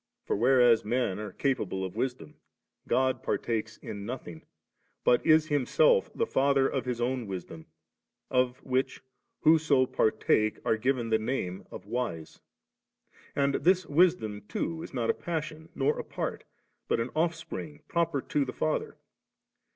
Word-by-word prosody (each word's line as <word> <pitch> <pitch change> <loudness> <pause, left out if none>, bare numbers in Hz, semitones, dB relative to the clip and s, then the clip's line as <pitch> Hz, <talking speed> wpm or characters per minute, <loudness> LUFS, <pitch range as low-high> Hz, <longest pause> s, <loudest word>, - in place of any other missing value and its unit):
For, - - 0
whereas 120 0 +5
men 110 -3 0
are 105 -1 -5
capable 105 -9 -1
of 95 - -7
wisdom, 125 - -3 0.5
God 130 0 +1
partakes 115 -1 -2
in 100 -2 -7
nothing, 100 -8 -7 0.6
but 120 - +4
is 155 0 +4
Him 145 -4 +1
self 485 -1 +4
the 460 - +1
Father 140 - +3
of 135 -3 -2
His 125 -2 -2
own 125 -1 -1
Wisdom, 85 -4 -7 0.6
of 125 -1 +2
which 130 0 -1 0.4
whoso 155 -4 +4
partake 110 -2 +1
are - - +3
^ven 120 0 -1
the 110 - +4
name 110 -6 -3
of 95 - -9
wise. 105 -8 -4 1.0
And 140 0 +2
this 185 +3 +3
Wisdom 150 - +2
too 165 0 -3
is - - -8
not 120 -4 +1
a - - -4
passion, 160 -1 -5
nor 140 +2 +1
a - - -3
part, - - -4 0.4
but - - +1
an 115 +2 -2
Offspring 160 -2 -3
proper 165 -5 0
to 145 - 0
the 130 - -5
Father. 155 - -2
130 Hz, 150 wpm, -29 LUFS, 110-150 Hz, 1.0 s, whereas